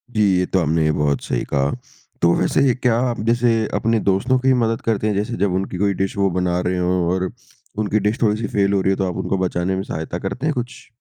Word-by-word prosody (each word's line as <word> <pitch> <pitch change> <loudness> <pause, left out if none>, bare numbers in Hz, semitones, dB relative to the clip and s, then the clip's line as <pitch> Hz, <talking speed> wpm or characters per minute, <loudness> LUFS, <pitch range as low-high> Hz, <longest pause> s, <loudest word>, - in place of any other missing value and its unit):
जी, 110 - +2 0.2
ये 90 - +1
तो 95 - 0
आपने 80 -1 +1
बहुत 75 -2 0
सही - - -2
कहा। 70 0 0 0.5
तो 85 0 +4
वैसे - - +1
ये 125 - +3
क्या 125 -2 +1
आप 120 - -4
जैसे 120 0 +3 0.3
अपने 115 0 +1
दोस्तों 100 +7 +1
की 130 +1 +3
मदद 115 0 -1
करते 110 -1 0
हैं 105 - +1
जैसे 105 +4 -2
जब 95 -2 +1
उनकी 95 0 -2
कोई 100 +1 +1
डिश 95 +1 -2
वो 100 -1 +2
बना 90 -1 0
रहे 90 - 0
हो 90 0 0 0.2
और 95 0 -1 0.5
उनकी 110 0 +1
डिश 105 +3 -1
थोड़ी-सी 110 -1 +1
फ़ेल 100 0 +2
हो 95 - +2
रही 95 - +2
है 95 - 0
तो 95 - 0
आप 90 - -5
उनको 95 - -1
बचाने 90 0 -1
में 95 - -2
सहायता 80 -1 -5
करते 100 +10 -4
हैं 155 - +1
कुछ? 125 +1 -6
95 Hz, 245 wpm, -20 LUFS, 90-115 Hz, 0.5 s, तो